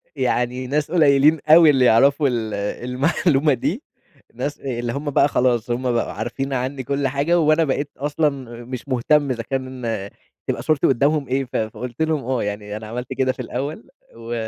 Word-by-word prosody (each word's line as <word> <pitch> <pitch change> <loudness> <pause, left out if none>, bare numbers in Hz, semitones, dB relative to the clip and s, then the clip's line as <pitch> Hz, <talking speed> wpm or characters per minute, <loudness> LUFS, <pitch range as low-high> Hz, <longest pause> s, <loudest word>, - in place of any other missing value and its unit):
يعني 125 +1 -1
ناس 145 +3 -1
قليلين 150 -2 +4
أوي 160 0 +8
اللي 135 -3 +4
يعرفوا 140 +5 +4
ال 115 -4 -2 0.3
المعلومة 140 +3 +2
دي، 175 - -2 0.5
ناس 145 0 -4
اللي 120 -3 -3
هُم 145 +3 -3
بقى 140 - +4
خلاص 125 -4 +1
هُم 125 +1 -1
بقوا 120 - -1
عارفين 125 +6 -4
عني 130 +1 -3
كُل 140 +2 -1
حاجة 145 +6 +1
وأنا 155 0 +3
بقيت 145 -1 -2
أصلًا 150 +2 +1 0.4
مش 125 +2 -7
مهتم 140 +2 +2
إذا 115 -2 -3
كان 130 +1 -4 0.7
تبقى - - -2
صورتي 155 -3 +2
قدامهم 140 +2 +1
إيه 135 +1 0
ف 125 - -13
فقلت 115 +4 -4
لهم 160 -3 0
آه 130 -1 -1
يعني 105 0 -4
أنا 110 0 -9
عملت 120 +3 -5
كده 130 -1 +1
في - - -7
الأول 135 0 -5 0.3
و 115 +1 -7
135 Hz, 175 wpm, -21 LUFS, 120-145 Hz, 0.7 s, أوي